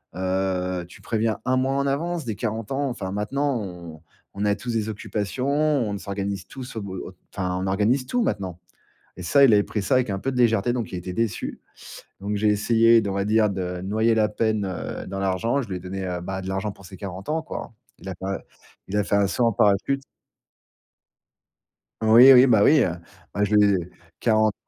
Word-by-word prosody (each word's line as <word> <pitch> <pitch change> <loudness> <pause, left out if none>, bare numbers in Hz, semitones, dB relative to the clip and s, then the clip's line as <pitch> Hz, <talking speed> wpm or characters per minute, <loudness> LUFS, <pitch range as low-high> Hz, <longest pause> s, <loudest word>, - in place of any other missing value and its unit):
heu, 95 -1 -1
tu - - -15
préviens 110 -2 -1
1 130 0 +2
mois 135 +1 +1
en 140 0 0
avance, 165 +3 -2
des 110 -3 -3
40 110 +3 -4
ans 140 +1 0
enfin, 100 -7 -5
maintenant, 125 +6 -1
on 85 -5 -9 0.4
on 105 - 0
a 105 - +3
tous 120 +2 -5
des 110 -1 -1
occupations, 110 +4 -3
on 145 -8 +1
s'organise 100 0 -4
tous 130 -2 -9
au 110 - -3
b 100 - -7 0.4
enfin, 90 -2 -2
on 95 - -2
organise 105 +7 +1
tout 245 - 0
maintenant» 95 - -3 0.6
et - - -6
ça, 140 +10 +5
il 125 - +6
avait 105 -1 +5
pris 105 - -3
ça 115 - +1
avec 125 -2 +1
un 95 -1 -2
peu 135 +6 -2
de 125 - -3
légèreté, 115 -1 +3
donc 120 -3 -3
il 90 - -5
était 90 +1 -5
déçu. 115 +1 -2 0.6
Donc 100 +2 -3
j'ai 105 +1 +2
essayé 115 +2 +4
de, 100 - -3
on - - -2
va 100 0 0
dire, 105 +1 +3
de 90 -2 -3
noyer 110 +4 +1
la 110 -1 +3
peine, 110 -1 0
heu, 90 -3 -5
dans 95 +1 -5
l'argent, 95 +8 0
je 115 - -8
lui 95 - -3
ai - - -8
donné, 95 +1 -6
heu, 90 -1 -3
bah, 95 +2 -5
de 95 - -6
l'argent 95 +2 -2
pour 100 -2 -16
ses 95 +1 -11
40 95 +2 -7
ans, 160 +1 0
quoi. 160 - -7 0.3
Il 95 - -8
a 95 - -5
pas 95 +1 -4 0.5
il 105 - -1
a 105 - +2
fait 100 - +1
un 100 -1 +3
saut 120 +5 +1
en 115 - +2
parachute. 105 +8 +2 2.0
Oui, 115 +5 +8
oui, 125 0 +8
bah, 110 -6 +4
oui, 150 +2 +6
heu, 90 - 0 0.4
bah, 100 - 0
je 105 +1 +1
lui 105 -1 +5
ai 90 -2 -2 0.3
40 110 -2 +3
105 Hz, 220 wpm, -24 LUFS, 95-120 Hz, 2.0 s, Oui